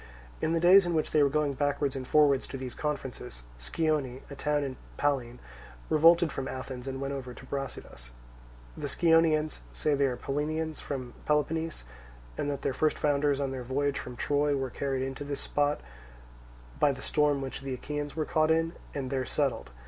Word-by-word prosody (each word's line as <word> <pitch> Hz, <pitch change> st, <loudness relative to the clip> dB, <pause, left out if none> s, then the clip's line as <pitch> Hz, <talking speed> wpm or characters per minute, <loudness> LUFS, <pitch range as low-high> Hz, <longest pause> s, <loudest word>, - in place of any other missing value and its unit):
In 160 Hz, -, +1 dB
the 165 Hz, -, +2 dB
days 180 Hz, +2 st, +7 dB
in 170 Hz, -, 0 dB
which 155 Hz, -, 0 dB
they 150 Hz, -, +4 dB
were 140 Hz, -, +5 dB
going 150 Hz, 0 st, +1 dB
backwards 145 Hz, 0 st, 0 dB
and 130 Hz, -1 st, -5 dB
forwards 145 Hz, -3 st, +4 dB
to 135 Hz, -, -6 dB
these 130 Hz, -2 st, -5 dB
conferences, 130 Hz, -, -4 dB, 0.2 s
Scione, 140 Hz, -, -1 dB
a -, -, -6 dB
town 150 Hz, +1 st, 0 dB
in 135 Hz, -2 st, -4 dB, 0.2 s
Pallene, 130 Hz, -4 st, 0 dB, 0.5 s
revolted 165 Hz, +1 st, +6 dB
from 135 Hz, -, -4 dB
Athens, 130 Hz, 0 st, -6 dB
and 135 Hz, 0 st, -3 dB
went 140 Hz, 0 st, -2 dB
over 130 Hz, -3 st, -6 dB
to 130 Hz, -, -12 dB
Brasidas. 130 Hz, -, -6 dB, 0.7 s
The -, -, -4 dB
Scionaeans 160 Hz, -2 st, +3 dB
say 155 Hz, -, 0 dB
that 145 Hz, -, +3 dB
they 140 Hz, 0 st, +3 dB
are 125 Hz, -2 st, -2 dB
Pallenians 155 Hz, +4 st, -2 dB
from 130 Hz, -4 st, -5 dB
Peloponnese, 160 Hz, -, 0 dB, 0.5 s
and 145 Hz, -, -2 dB
that 140 Hz, -1 st, -3 dB
their -, -, 0 dB
first 155 Hz, +4 st, +1 dB
founders 145 Hz, -1 st, +2 dB
on 135 Hz, -1 st, -1 dB
their 130 Hz, -1 st, -4 dB
voyage 140 Hz, +3 st, 0 dB
from 125 Hz, -, -7 dB
Troy 145 Hz, +3 st, +1 dB
were 135 Hz, -2 st, -2 dB
carried 135 Hz, 0 st, -1 dB
in 135 Hz, -, -3 dB
to 140 Hz, -, -6 dB
this 140 Hz, -1 st, -3 dB
spot 145 Hz, 0 st, +1 dB, 1.0 s
by 145 Hz, -, +5 dB
the 130 Hz, -1 st, -7 dB
storm 150 Hz, -2 st, +2 dB
which 135 Hz, 0 st, -5 dB
the 135 Hz, -1 st, -3 dB
Achaeans 145 Hz, +2 st, -4 dB
were 155 Hz, -1 st, 0 dB
caught 155 Hz, +1 st, +2 dB
in, 165 Hz, +1 st, +2 dB, 0.2 s
and 135 Hz, -2 st, -3 dB
there 135 Hz, -1 st, 0 dB
settled. 130 Hz, -, -1 dB
145 Hz, 195 wpm, -29 LUFS, 130-150 Hz, 1.0 s, days